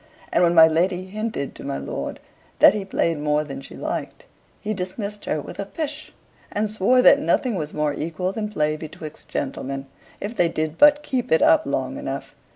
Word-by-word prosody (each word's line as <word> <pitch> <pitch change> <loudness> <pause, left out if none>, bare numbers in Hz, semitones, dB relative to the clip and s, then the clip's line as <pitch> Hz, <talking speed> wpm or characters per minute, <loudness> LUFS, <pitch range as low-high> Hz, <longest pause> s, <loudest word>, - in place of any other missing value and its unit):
And 170 - +4
when 175 -1 +4
my 160 -1 +9
lady 180 +3 +1
hinted 210 -7 -4
to - - -11
my - - -3
lord 70 - -5 0.4
that - - +8
he 205 -2 -3
played 165 -4 0
more 150 0 +1
than 135 -2 -7
she - - -10
liked, - - -5 0.3
he 215 - -3
dismissed 200 +2 -4
her 155 - -1
with - - -9
a 200 - -2
"pish," 300 +5 -5 0.4
and 210 0 0
swore 230 +5 +3
that 280 - +8
nothing 260 -4 +1
was 155 -6 -3
more 150 -1 0
equal 165 +5 -2
than 210 +1 -3
play 155 -6 0
betwixt 155 0 -9
gentlemen, 135 0 -3 0.3
if 210 +4 -5
they 175 -5 +3
did 155 0 -3
but 295 0 +6
keep 260 -4 -2
it 160 - +5
up 315 0 +5
long - - -2
enough. - - -5
180 Hz, 195 wpm, -23 LUFS, 155-215 Hz, 0.4 s, my